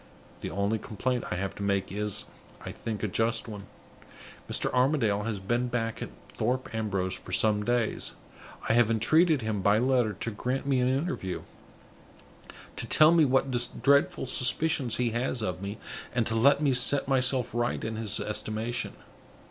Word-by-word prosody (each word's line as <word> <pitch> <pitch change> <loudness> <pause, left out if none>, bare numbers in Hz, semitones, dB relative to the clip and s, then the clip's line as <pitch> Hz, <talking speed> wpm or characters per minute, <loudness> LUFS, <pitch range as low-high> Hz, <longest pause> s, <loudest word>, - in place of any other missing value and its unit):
The - - -5
only 100 +3 -1
complaint 120 +4 -2
I - - -2
have 95 +2 -3
to - - -7
make 100 -2 0
is, 105 0 -2 0.4
I - - -5
think, 110 -2 -5
a - - +1
just 115 +5 -1
one. 100 -2 -8 0.8
Mr. - - 0
Armadale 125 -6 +2
has 110 -3 -3
been 120 +6 -1
back 115 -2 -3
at - - -4 0.2
Thorpe 125 +1 -2
Ambrose 100 -4 -1
for - - -5
some 105 +2 +3
days. 120 -1 -1 0.5
I - - +3
have 120 -1 +4
entreated 150 - +3
him, 110 -2 -2
by 100 +2 +4
letter, 125 -2 +2
to 115 - -4
grant 125 +6 -3
me 135 -2 +2
an 125 - +2
interview; 130 - -2 1.3
to - - -1
tell 155 +1 +6
me 165 -2 +5
what 135 0 +2 0.3
dreadful 140 -1 +3
suspicions 130 0 +2
he 120 -2 0
has 120 0 -2
of 90 -3 -3
me, 100 +2 -5 0.4
and 120 -2 +2
to 110 - -1
let 140 +6 +4
me 140 -3 +3
set 130 +3 +2
myself 130 -2 +1
right 120 0 -1
in 110 0 -3
his 105 -2 -1
estimation. 110 +2 -3
115 Hz, 170 wpm, -28 LUFS, 105-130 Hz, 1.3 s, tell